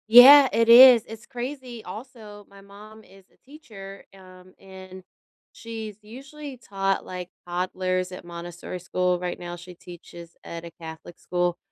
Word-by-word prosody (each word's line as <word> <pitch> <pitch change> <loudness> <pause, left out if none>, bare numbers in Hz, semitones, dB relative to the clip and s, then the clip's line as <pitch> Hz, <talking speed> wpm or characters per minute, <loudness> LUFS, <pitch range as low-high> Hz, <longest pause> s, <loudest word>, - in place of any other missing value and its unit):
Yeah, 265 +4 +9
it 230 0 +1
is, 245 -1 +9
it's 225 +1 -11
crazy. 250 -2 -7
Also, 210 0 -11
my 200 0 -16
mom 210 +2 -15
is 195 -2 -20
a - - -31
teacher, 210 -10 -12
um, 185 -1 -17
and 190 -1 -13 0.5
she's 225 -3 -8
usually 270 +5 -11
taught, 195 -4 -3
like, 180 -1 -8 0.2
toddlers 185 +1 -2
at 180 -1 -10
Montessori 175 +1 -8
school. 180 0 -1
Right 180 0 -5
now 175 0 -7
she 175 +1 -12
teaches 170 -1 -13
at 170 0 -8
a 170 - -10
Catholic 160 +1 -11
school. 175 -1 -2
195 Hz, 150 wpm, -24 LUFS, 180-230 Hz, 0.5 s, Yeah